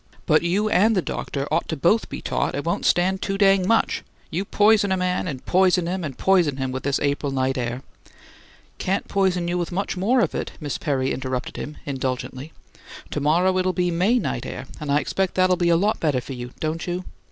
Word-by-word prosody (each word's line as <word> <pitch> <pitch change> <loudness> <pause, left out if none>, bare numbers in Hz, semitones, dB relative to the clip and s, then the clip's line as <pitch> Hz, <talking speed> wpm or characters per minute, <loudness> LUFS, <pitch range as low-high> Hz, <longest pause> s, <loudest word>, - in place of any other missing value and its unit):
"But 155 -1 +4
you 190 +5 +1
and 215 +2 +3
the 185 - +2
doctor 140 0 -3
ought - - +1
to 160 - -3
both 190 +10 +2
be - - -6
taught - - -1
it - - -3
won't - - 0
stand 185 +2 +2
too 195 0 -2
dang 195 -2 +4
much! 225 +1 +2 0.3
You 180 +5 -2
poison 205 -1 +3
a 190 - +2
man 180 0 -1
and 135 -5 -6
poison 180 -1 +3
and 170 -7 -3
poison 175 -8 +3
him 130 -1 -2
with 130 0 -4
this 140 0 0
April 140 0 0
night 130 0 0
air 125 0 -3 0.5
" - - -27
"Can't 195 +2 -1
poison 185 -3 +1
you 175 +1 0
with 175 - -3
much 195 +3 -2
more 235 +7 +3
of - - 0
it," - - -4
Miss 145 -4 -4
Perry 135 -2 0
interrupted 130 -1 -3
him, 150 - -6
indulgently. 130 +1 -4 0.6
"To - - -2
morrow 175 +6 +2
it'll 185 0 +1
be 180 -1 0
May 185 +9 +2
night 225 - -2
air, - - -6
and 150 -2 -3
I 145 - +4
expect 190 +6 -1
that'll 185 0 +4
be 175 -1 +1
a 170 - +5
lot 205 +5 +1
better 150 -5 +1
for 135 - -7
you, 125 -1 -6
don't 160 +2 -3
you? 180 +1 -2
175 Hz, 220 wpm, -23 LUFS, 140-190 Hz, 0.6 s, a